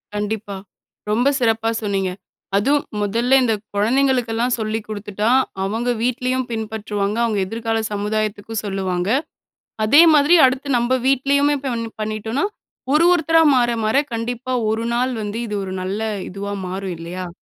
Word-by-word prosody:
கண்டிப்பா. 210 Hz, -1 st, -3 dB, 0.6 s
ரொம்ப 240 Hz, +5 st, +2 dB
சிறப்பா 225 Hz, -2 st, +1 dB
சொன்னீங்க. 195 Hz, -2 st, -1 dB, 0.5 s
அதுவும், 280 Hz, +8 st, +2 dB, 0.2 s
முதல்ல 235 Hz, +6 st, +2 dB
இந்த 225 Hz, -, +2 dB, 0.2 s
குழந்தைங்களுக்கெல்லாம் 245 Hz, +1 st, +1 dB
சொல்லி 215 Hz, 0 st, -1 dB
குடுத்துட்டா, 210 Hz, 0 st, -2 dB, 0.3 s
அவங்க 225 Hz, +5 st, -1 dB
வீட்லயும் 255 Hz, +1 st, -1 dB
பின்பற்றுவாங்க, 215 Hz, -2 st, -3 dB
அவங்க 220 Hz, -3 st, 0 dB
எதிர்கால 225 Hz, +1 st, -2 dB
சமுதாயத்துக்கும் 215 Hz, +1 st, -2 dB
சொல்லுவாங்க. 190 Hz, -2 st, -2 dB, 0.8 s
அதே 290 Hz, +9 st, +7 dB
மாதிரி, 300 Hz, +4 st, +5 dB
அடுத்து 260 Hz, +2 st, -2 dB
நம்ம 245 Hz, +2 st, +1 dB
வீட்லயுமே 280 Hz, +2 st, +2 dB
பண்ணி 230 Hz, -3 st, -3 dB
பண்ணிட்டோன்னா, 215 Hz, +4 st, -2 dB, 0.5 s
ஒரு 310 Hz, +3 st, +5 dB
ஒருத்தரா 325 Hz, -1 st, +3 dB
மாற, 240 Hz, -1 st, +3 dB
மாற 215 Hz, +4 st, +1 dB, 0.2 s
கண்டிப்பா 240 Hz, +2 st, -3 dB, 0.2 s
ஒரு 220 Hz, +1 st, -1 dB
நாள் 250 Hz, +2 st, +1 dB
வந்து 210 Hz, +1 st, -4 dB
இது 210 Hz, -, -4 dB
ஒரு 190 Hz, 0 st, -5 dB
நல்ல 195 Hz, +4 st, -3 dB, 0.3 s
இதுவா 200 Hz, +2 st, -5 dB
மாறும், 190 Hz, 0 st, -4 dB
இல்லையா? 175 Hz, +2 st, -6 dB
225 Hz, 130 wpm, -20 LUFS, 205-250 Hz, 0.8 s, அதே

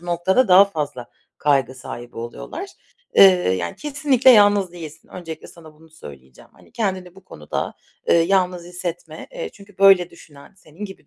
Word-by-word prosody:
bu 175 Hz, -, -15 dB
noktada 190 Hz, +8 st, +1 dB
daha 185 Hz, +2 st, +8 dB
fazla 150 Hz, -10 st, -6 dB, 0.3 s
kaygı 135 Hz, -3 st, +1 dB
sahibi 120 Hz, -1 st, -10 dB
oluyorlar. 120 Hz, -, -7 dB, 0.5 s
Eee, -, -, +7 dB, 0.4 s
yani, 85 Hz, -1 st, -5 dB
kesinlikle 280 Hz, -3 st, +2 dB
yalnız 205 Hz, -4 st, +4 dB
değilsin. 160 Hz, -2 st, -11 dB
Öncelikle 165 Hz, -3 st, -9 dB
sana 160 Hz, -2 st, -16 dB
bunu 160 Hz, +1 st, -21 dB
söyleyeceğim. 65 Hz, -, -15 dB
Hani, -, -, -22 dB
kendini 185 Hz, -5 st, -4 dB
bu 195 Hz, -1 st, -18 dB
konuda, 75 Hz, -, -6 dB, 0.4 s
ııı, 170 Hz, -, +5 dB
yalnız 180 Hz, -1 st, 0 dB
hissetme. 175 Hz, -2 st, -7 dB
Eee, -, -, -6 dB
çünkü, 200 Hz, -2 st, -18 dB
böyle, 195 Hz, -3 st, +5 dB
düşünen, 145 Hz, 0 st, -17 dB
senin 180 Hz, +3 st, -11 dB
gibi 195 Hz, -7 st, -11 dB
175 Hz, 155 wpm, -20 LUFS, 155-195 Hz, 0.5 s, daha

